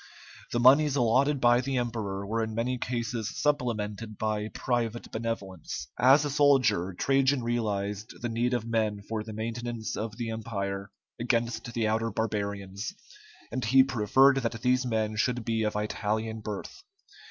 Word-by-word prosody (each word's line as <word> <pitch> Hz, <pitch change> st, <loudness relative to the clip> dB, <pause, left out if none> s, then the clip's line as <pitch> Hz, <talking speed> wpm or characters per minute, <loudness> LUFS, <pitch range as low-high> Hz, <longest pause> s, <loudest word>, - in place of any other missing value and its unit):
The 120 Hz, -, 0 dB
moneys 140 Hz, +4 st, +6 dB
allotted 135 Hz, +3 st, +3 dB
by 120 Hz, 0 st, +5 dB
the 135 Hz, +1 st, -2 dB
emperor 110 Hz, -5 st, -2 dB
were 115 Hz, +2 st, -1 dB
in 110 Hz, -1 st, -4 dB
many 125 Hz, +2 st, -1 dB
cases 115 Hz, -2 st, -2 dB
supplemented 115 Hz, -6 st, -1 dB
by 110 Hz, -1 st, -1 dB
private 120 Hz, 0 st, -2 dB
benevolence. 95 Hz, -, -4 dB
As 135 Hz, +4 st, +6 dB
a 145 Hz, -, -2 dB
soldier, 125 Hz, -11 st, +3 dB
Trajan 135 Hz, -1 st, +2 dB
realized 105 Hz, -3 st, -2 dB
the 120 Hz, -, -2 dB
need 120 Hz, +2 st, 0 dB
of 115 Hz, -2 st, -2 dB
men 110 Hz, -3 st, -1 dB
for 110 Hz, -1 st, -2 dB
the 110 Hz, -, -8 dB
maintenance 115 Hz, +1 st, -4 dB
of 110 Hz, 0 st, -4 dB
the 115 Hz, -2 st, -3 dB
Empire 100 Hz, -3 st, -4 dB, 0.3 s
against 115 Hz, 0 st, -1 dB
the 115 Hz, -2 st, +1 dB
outer 110 Hz, +1 st, 0 dB
barbarians, 100 Hz, -, -3 dB, 0.6 s
and 130 Hz, -, -2 dB
he 130 Hz, +4 st, +6 dB
preferred 135 Hz, +2 st, +4 dB
that 115 Hz, -3 st, -2 dB
these 125 Hz, 0 st, +2 dB
men 110 Hz, -2 st, -1 dB
should 125 Hz, 0 st, 0 dB
be 115 Hz, -1 st, 0 dB
of 105 Hz, -1 st, -1 dB
Italian 110 Hz, +1 st, -2 dB
birth. 110 Hz, -, -6 dB
115 Hz, 155 wpm, -28 LUFS, 105-125 Hz, 0.6 s, moneys